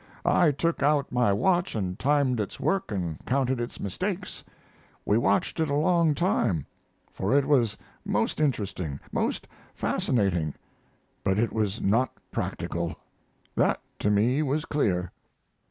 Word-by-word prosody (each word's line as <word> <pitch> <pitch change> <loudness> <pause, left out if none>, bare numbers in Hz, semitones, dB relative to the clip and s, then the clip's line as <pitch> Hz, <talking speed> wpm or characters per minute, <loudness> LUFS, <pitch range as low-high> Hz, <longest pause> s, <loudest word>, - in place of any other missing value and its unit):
I 170 -4 +4
took 165 +4 -1
out 145 -1 +2
my 125 -4 +3
watch 175 - +1
and 95 -3 -2
timed 140 -4 +2
its 105 - -4
work 195 -10 0
and 85 -6 -3
counted 130 -1 +1
its 120 - -5
mistakes. 185 - -4 0.6
We 105 - +3
watched 170 +7 +1
it 160 -2 +1
a 140 - +1
long 165 0 +3
time, 120 - +1 0.5
for 105 +9 +1
it 140 - +3
was 125 -7 +2 0.3
most - - 0
interesting, 95 - -1
most - - -1 0.3
fascinating, 90 - 0 0.7
but 95 0 +1
it 115 +2 +1
was 105 -1 -1
not 115 +6 +2 0.2
practical 85 -1 -3 0.6
that - - +2 0.2
to 105 - +1
me 115 +8 +3
was 150 +1 0
clear." 90 - 0
125 Hz, 140 wpm, -27 LUFS, 100-150 Hz, 0.7 s, I